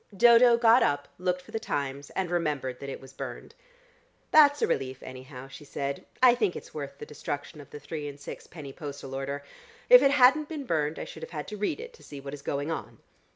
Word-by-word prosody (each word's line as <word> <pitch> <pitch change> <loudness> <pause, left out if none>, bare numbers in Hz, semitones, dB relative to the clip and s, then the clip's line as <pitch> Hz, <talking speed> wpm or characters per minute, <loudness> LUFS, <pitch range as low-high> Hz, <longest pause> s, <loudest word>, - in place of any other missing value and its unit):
Dodo 235 +1 +7
got 235 +1 +6
up, 145 0 +1
looked 180 0 -1
for - - -15
the 225 - -2
Times, 140 -7 -3
and 185 -2 -1
remembered 150 -7 -1
that 140 - -6
it - - -6
was 135 0 -14
burned. - - -7 0.8
"That's 290 -2 +6
a - - +6
relief 130 -1 -2
anyhow," 130 0 -9
she 135 +3 -11
said. 140 -1 -4 0.2
"I 250 -2 +9
think 215 -7 0
it's - - -9
worth 140 -2 -6
the - - -8
destruction 145 0 -6
of 140 - -15
the 150 - -9
three 150 -1 -5
and 145 0 -8
six - - -9
penny 145 -5 -9
postal 140 -3 -7
order. 140 +1 -4 0.5
If - - +11
it - - +5
hadn't 280 +2 +5
been 300 -4 -5
burned 155 -5 0
I - - -4
should - - -10
have 480 - -5
to 210 - -7
read 210 - -1
it 475 +1 -8
to 465 - -18
see 145 - -9
what 140 0 -8
is 145 - -7
going 145 +3 -2
on." 160 - -5
150 Hz, 225 wpm, -28 LUFS, 140-230 Hz, 0.8 s, If